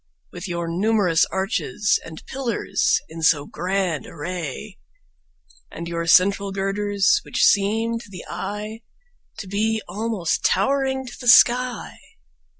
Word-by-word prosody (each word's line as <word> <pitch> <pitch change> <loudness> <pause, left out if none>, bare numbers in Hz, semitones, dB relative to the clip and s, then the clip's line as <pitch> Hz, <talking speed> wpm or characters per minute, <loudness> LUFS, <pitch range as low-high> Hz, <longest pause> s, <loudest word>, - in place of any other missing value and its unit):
With 180 +3 -7
your 170 -1 -3
numerous 185 -1 +2
arches 190 - -1
and 160 -1 -11
pillars 260 -4 0
in 165 +1 -9
so 150 -2 +3
grand 180 -3 -2
array 180 - -6 0.9
And 170 - -7
your 170 0 -3
central 195 +3 +4
girders, 200 +1 +1
which - - -1
seem 225 +3 +2
to 230 - -13
the 185 -3 -9
eye 210 +5 -5 0.6
To 200 - -7
be 220 +3 0
almost 210 -7 -2
towering 265 +6 +1
to 240 - -9
the 245 - -7
sky. 245 0 +4
195 Hz, 125 wpm, -22 LUFS, 175-220 Hz, 0.9 s, central